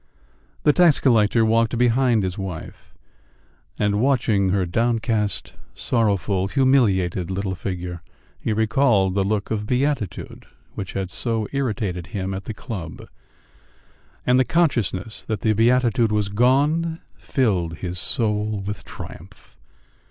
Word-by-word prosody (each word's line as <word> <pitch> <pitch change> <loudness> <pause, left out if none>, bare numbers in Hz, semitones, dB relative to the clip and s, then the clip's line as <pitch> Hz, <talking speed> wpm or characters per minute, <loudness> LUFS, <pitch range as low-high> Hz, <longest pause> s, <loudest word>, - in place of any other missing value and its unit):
The 150 - +5
tax 175 -3 +5
collector 115 -3 +3
walked 115 +1 +2
behind 120 -2 +3
his 90 -1 -2
wife, 95 -5 -7 0.9
and 105 0 +1
watching 115 -7 +2
her 95 0 +1
downcast, 110 0 -1 0.2
sorrowful, 100 -4 0
humiliated 100 -9 +2
little 95 0 -2
figure, 90 -2 -5 0.4
he - - -2
recalled 110 -3 +2
the 100 - +1
look 100 +1 -2
of 105 -1 -2
beatitude 125 - -2 0.3
which 95 -1 -6
had 95 -2 -3
so 110 +1 -2
irritated 105 -10 -2
him 95 -3 -4
at 95 +1 -6
the 110 - -5
club, 90 -10 -7 1.2
and 125 +1 +4
the - - +5
consciousness 115 - 0
that 110 -4 -3
the 110 - +2
beatitude 115 0 +3
was 105 -2 0
gone 145 +9 +2
filled 90 - -1
his 90 +1 -5
soul 105 -1 +1
with 105 +1 -5
triumph. 90 -8 -11
105 Hz, 125 wpm, -22 LUFS, 95-120 Hz, 1.2 s, The